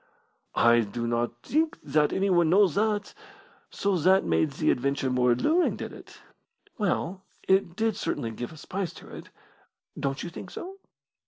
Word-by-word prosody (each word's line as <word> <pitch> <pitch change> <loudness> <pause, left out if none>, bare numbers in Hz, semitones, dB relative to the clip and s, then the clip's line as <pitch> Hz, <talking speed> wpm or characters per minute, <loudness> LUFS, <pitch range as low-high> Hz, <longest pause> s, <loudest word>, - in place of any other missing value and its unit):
"I 120 0 +5
do 115 +2 -2
not 120 +1 -2
think 315 +2 0
that 150 +1 +2
anyone 180 -4 +2
knows 190 -1 +5
that. 210 -1 0 0.6
So 200 -3 0
that 185 +4 +4
made 80 -1 +1
the - - +2
adventure 135 +1 0
more 125 -1 +3
alluring, 320 - +2
did - - -7
it?" - - -13 0.6
"Well, 190 -2 -1 0.3
it 190 -3 +2
did 220 0 0
certainly 115 - -3
give 120 +5 -6
a 160 - -12
spice 185 +3 -4
to - - -11
it. - - -10 0.7
Don't 135 0 -2
you 175 - -6
think 180 - -9
so?" 385 - -8
170 Hz, 160 wpm, -27 LUFS, 125-200 Hz, 0.7 s, I